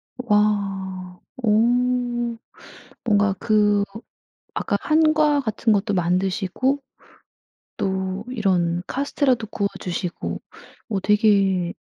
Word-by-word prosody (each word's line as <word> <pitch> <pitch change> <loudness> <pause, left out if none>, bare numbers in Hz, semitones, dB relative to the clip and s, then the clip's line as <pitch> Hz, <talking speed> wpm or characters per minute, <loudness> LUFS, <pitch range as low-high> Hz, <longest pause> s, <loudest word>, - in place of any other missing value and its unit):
와. 195 -5 -1 0.2
어 220 - +2 1.6
뭔가 205 -3 +3
그 210 -2 +3 0.7
아까 - - 0
한과 310 -2 +3
같은 220 -2 0
것도 205 0 +1
만드시고 190 +9 0 1.0
또 190 +1 -2
이런 180 -7 +1
카스텔라도 265 -4 0
구워주시고 185 -4 -3 0.5
어 195 - 0
되게 195 -4 +3
205 Hz, 165 characters per minute, -22 LUFS, 190-225 Hz, 1.6 s, 뭔가